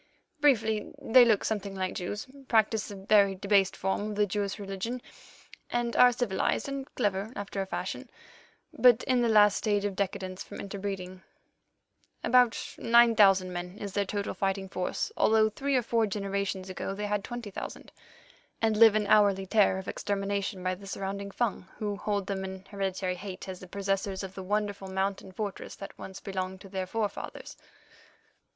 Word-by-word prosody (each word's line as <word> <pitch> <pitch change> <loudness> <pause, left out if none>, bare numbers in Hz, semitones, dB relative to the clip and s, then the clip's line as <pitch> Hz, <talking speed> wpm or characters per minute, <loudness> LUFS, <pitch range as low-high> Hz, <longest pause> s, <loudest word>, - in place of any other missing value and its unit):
Briefly, 225 -7 +2
they 250 +2 +6
look 225 -4 +3
something 200 -2 -2
like 185 -1 -2
Jews, 205 +4 -4 0.2
practise 220 -1 +2
a 205 - -7
very 200 0 +4
debased 195 0 +2
form 190 +2 -1
of 210 - -4
the 210 0 +3
Jewish 200 0 -2
religion, 200 +4 -4 0.7
are 240 +1 +4
civilized 240 -2 0
and 275 -1 -4
clever 205 -2 -1
after 200 -1 -4
a 190 - -4
fashion, - - -4 0.6
but 250 -1 +5
in 255 -2 +2
the 235 - +2
last 210 -2 +6
stage 205 -2 0
of 200 -2 -2
decadence 190 -1 -3
from - - -10
interbreeding—about 200 +5 -3
nine 235 0 +5
thousand 195 -3 +5
men 180 +2 -5
is 200 -2 -6
their 200 - +1
total 200 +1 -2
fighting 195 -1 -1
force, 185 - -2
although 220 0 +4
three 275 +5 -1
or 250 - +3
four 230 -1 +1
generations 200 -1 -2
ago 190 +1 -4
they 210 +1 -3
had 205 -1 -1
twenty 240 -3 -6
thousand—and 225 - -6
live 225 -1 +8
in 215 -1 +2
hourly 200 -2 +4
terror 200 -1 +3
of 190 - -7
extermination 200 -1 -2
by 185 0 0
the 195 +2 -10
surrounding 195 0 -4
Fung, 200 -3 -2
who 205 -1 -2
hold 200 -1 -2
them 195 -1 -3
in 190 0 -7
hereditary 190 -2 -2
hate 195 0 -7
as 185 -1 -6
the 185 - -11
possessors 195 0 -2
of 190 -1 -7
the 190 - -7
wonderful 205 0 -2
mountain 190 0 -2
fortress 200 +1 -5
that 195 - -9
once 190 0 -8
belonged 190 -1 -4
to 195 - -12
their 190 -1 -3
forefathers." 210 0 -4
200 Hz, 165 wpm, -29 LUFS, 190-215 Hz, 0.7 s, live